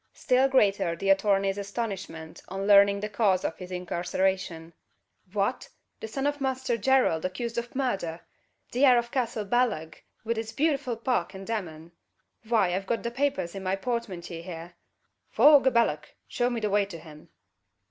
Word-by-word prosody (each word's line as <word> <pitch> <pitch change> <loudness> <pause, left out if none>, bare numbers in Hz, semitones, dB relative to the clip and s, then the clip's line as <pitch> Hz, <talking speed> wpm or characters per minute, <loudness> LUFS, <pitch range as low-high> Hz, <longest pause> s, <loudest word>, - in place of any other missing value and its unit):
Still 260 0 +2
greater 200 -9 +2
the 195 +4 +1
attorney's 195 0 +2
astonishment 195 -6 -5
on 195 +1 -4
learning 200 0 +6
the 210 - -2
cause 205 -3 +1
of 160 - -3
his 180 -1 -8
incarceration. 180 -1 -2 0.6
"Fwhat! 210 +5 -1 0.3
the - - -6
son 270 +5 -3
of 290 0 0
a - - -21
Munsther 260 -2 -1
Gerald 260 -11 +3
accused 225 +6 -3
of 240 +1 -8
murdher! 195 -11 -2 0.5
The 250 +3 0
heir 255 -3 +7
of 235 0 -1
Castle 235 -5 -2
Ballagh, 195 -9 0 0.2
wid 230 0 -1
its 225 0 -6
bewtiful 275 -6 0
park 240 -3 -1
and 190 0 -8
demesne. 170 -7 -5 0.5
Fwy, 215 -6 +2
I've 190 +1 -4
got 230 - -1
the 235 - -2
papers 270 -8 -1
in 195 - -6
my 190 0 0
portmantyee 195 -7 -4
here. 170 0 -8 0.6
Faugh 290 -3 +6
a - - +5
ballagh! 155 -11 +1 0.2
Show 245 0 0
me 240 -2 -2
the 210 -2 -1
way 205 0 +3
to 180 -4 -8
him!" 155 -1 -14
205 Hz, 170 wpm, -27 LUFS, 185-240 Hz, 0.6 s, heir